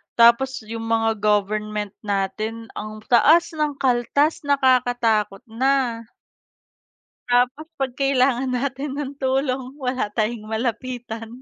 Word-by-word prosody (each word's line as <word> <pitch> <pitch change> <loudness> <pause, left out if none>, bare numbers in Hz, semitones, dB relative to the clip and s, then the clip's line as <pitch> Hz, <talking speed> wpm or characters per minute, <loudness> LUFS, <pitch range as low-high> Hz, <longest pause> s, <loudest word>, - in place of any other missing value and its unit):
Tapos 235 +2 +4
'yong 225 +1 -6
mga 225 0 +2
government 210 0 0
natin 215 +3 -3
ang 215 0 -8
taas 310 +8 +5
ng 300 -2 -1
kaltas 270 +5 +1
nakakatakot 245 -6 +2
na. 240 0 0 1.3
Tapos 250 +6 +1
pag 270 -2 -2
kailangan 265 -1 +1
natin 270 +2 -2
ng 285 -1 -4
tulong 265 0 -1
wala 255 -5 -2
tayong 215 -1 -1
malapitan. 230 0 -4
245 Hz, 105 wpm, -22 LUFS, 225-270 Hz, 1.3 s, taas